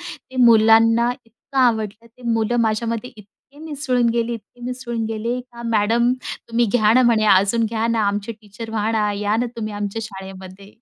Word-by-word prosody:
ते 260 0 -11
मुलांना 230 0 +5
इतकं 235 +4 -8
आवडलं. 225 -3 +1
ते 240 +2 -21
मुलं 225 +1 0
माझ्यामध्ये 230 +2 -1
इतके 210 -1 -17 0.2
मिसळून 285 -6 -1
गेले, 235 0 -1
इतके 230 +2 -13
मिसळून 240 -2 -4
गेले 230 +3 -3
का 235 0 -10
"मॅडम 230 +2 +2 0.4
तुम्ही 235 +1 +2
घ्या 215 -3 +4
ना" 255 - +5
म्हणे, 230 -3 +3
"अजून 200 +4 +4
घ्या 225 +1 -1
ना, 230 -1 +1
आमचे 205 +3 -3
टीचर 215 +1 -10
व्हा 220 0 -1
ना, 210 -2 +1
या 205 +1 -1
ना 245 +1 0
तुम्ही, 215 -2 -4
आमच्या 205 +2 -4
शाळेमध्ये." 190 -2 -10
225 Hz, 170 wpm, -21 LUFS, 210-235 Hz, 0.4 s, मुलांना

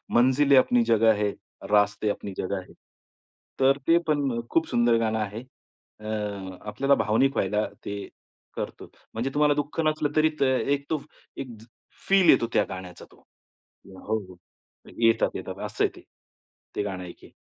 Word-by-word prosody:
मंजिले 130 +4 +5
अपनी 125 -2 +4
जगह 115 -1 +4
है, 105 - +1 0.4
रास्ते 105 0 +3
अपनी 100 -1 -4
जगह 95 0 -2
है. - - -16 0.9
तर 135 +1 +4
ते 165 - +6
पण 140 -6 0
खूप 165 - +1
सुंदर 120 -1 +3
गाणं 110 -1 0
आहे. 105 +1 -4 0.6
अ, 105 - -12 0.6
आपल्याला 135 +7 +2
भावनिक 130 +6 +2
व्हायला 105 +2 +1 0.2
ते 100 0 -5 0.5
करतो. - - -6 0.2
म्हणजे 115 +4 -2
तुम्हाला 150 0 +4
दुःख 145 +2 -3
नसलं 155 -1 +1
तरी 155 0 +4
त - - +6
एक 140 +2 +1
तो, 160 - +1
फ 140 - -12 0.3
एक 135 - -5
ज - - -15 0.4
फील 190 -3 +5
येतो 115 - +5 0.2
गाण्याचा 90 -1 -8
तो. - - -22 0.6
हो, 95 +3 -4
हो 95 -3 -11 0.6
येतात, 115 -1 +4
येतात. - - -6
असं - - -1
आहे - - -1
ते. - - -13 0.7
ते - - +1
गाणं 95 -3 -4
एक 85 - -10
आहे. - - -16
115 Hz, 160 wpm, -26 LUFS, 105-140 Hz, 0.9 s, ते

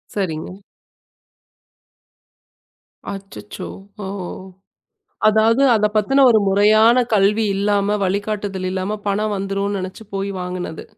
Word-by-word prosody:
சரிங்க. 185 +1 -4 2.5
அச்சச்சோ. 195 +1 -9 0.4
ஓ! - - -4 1.2
அதாவது 225 +4 +3
அத 210 - +2
பத்துன 270 +6 +4
ஒரு 220 - +5
முறையான 215 +5 +5
கல்வி 210 +2 +3
இல்லாம, 205 +1 +1
வழிகாட்டுதல் 200 -1 -2
இல்லாம 190 +3 -3
பணம் 210 +1 0
வந்துருனு 195 +1 -2
நினச்சு 185 +4 -7
போய் 195 0 -2
வாங்குனது. 180 -3 -5
200 Hz, 95 wpm, -20 LUFS, 195-215 Hz, 2.5 s, ஒரு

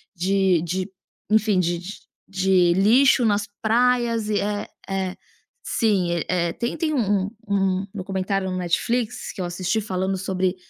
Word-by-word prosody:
de 185 -1 +2
de 185 +3 -3 0.4
enfim, 215 -3 +3
de 175 -1 0
de 180 +4 -7 0.3
de 185 -2 +3
lixo 240 +7 +5
nas 210 -1 +1
praias 235 0 +2
e 210 - +1
é, 205 0 -2 0.2
é, 190 -1 -2 0.5
sim, 200 - +1
e 165 - -2
eh, 170 -2 0
tem 235 0 -3
tem 315 -2 -1
um 205 -7 +1 0.2
um 195 -1 +1
documentário 195 -1 -2
no 185 - -2
Netflix 215 +7 -1
que - - -12
eu 180 - -1
assisti, 180 +4 -1
falando 190 -1 -2
sobre 185 0 -1
195 Hz, 150 wpm, -23 LUFS, 185-215 Hz, 0.5 s, lixo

